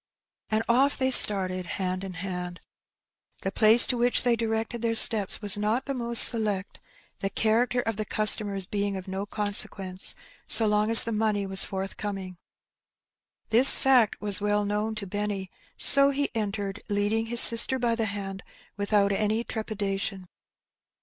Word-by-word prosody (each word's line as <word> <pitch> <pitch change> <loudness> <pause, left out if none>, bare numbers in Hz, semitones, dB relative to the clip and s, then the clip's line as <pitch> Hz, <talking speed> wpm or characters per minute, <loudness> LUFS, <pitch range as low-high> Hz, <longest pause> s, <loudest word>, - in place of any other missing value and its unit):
And 220 +1 -2
oflF 265 +4 0
they 260 -1 -2
started, 185 -6 +4
hand 185 0 -4
in 190 -1 -8
hand. 180 0 -8 0.8
The 195 - -4
place 220 +3 +4
to 255 - -2
which 245 +1 0
they 240 -1 0
directed 225 +1 -5
their 230 -1 -2
steps 210 -2 +3
was 205 0 0
not 220 +5 -3
the 275 - -5
most 235 -2 +5
select, 210 -4 0 0.4
the 195 - -4
character 230 +4 -1
of 225 -3 -6
the 215 - -3
customers 205 -2 +2
being 200 0 -5
of 185 - -11
no 195 +2 -6
consequence, 200 -3 -4 0.3
so 225 - +4
long 210 0 -1
as 230 - +7
the 230 - -6
money 210 -2 -2
•was 195 0 +1
forthcoming. 195 -1 -8 1.1
This 240 +4 +6
fact 255 -5 +1
was 205 -1 +3
well 205 0 -2
known 210 +2 -4
to 210 -2 -6
Benny, 200 -1 -6 0.3
so 275 0 +6
he 280 +1 -3
entered, 205 -2 -6
leading 205 +2 -2
his 240 +1 +4
sister 235 +3 +5
by 240 -2 -2
the 230 -1 -3
hand, 195 -2 -7 0.4
without 200 0 -1
any 215 +3 -2
trepida 210 -4 -5
tion. 195 -2 -6
210 Hz, 160 wpm, -24 LUFS, 195-225 Hz, 1.1 s, as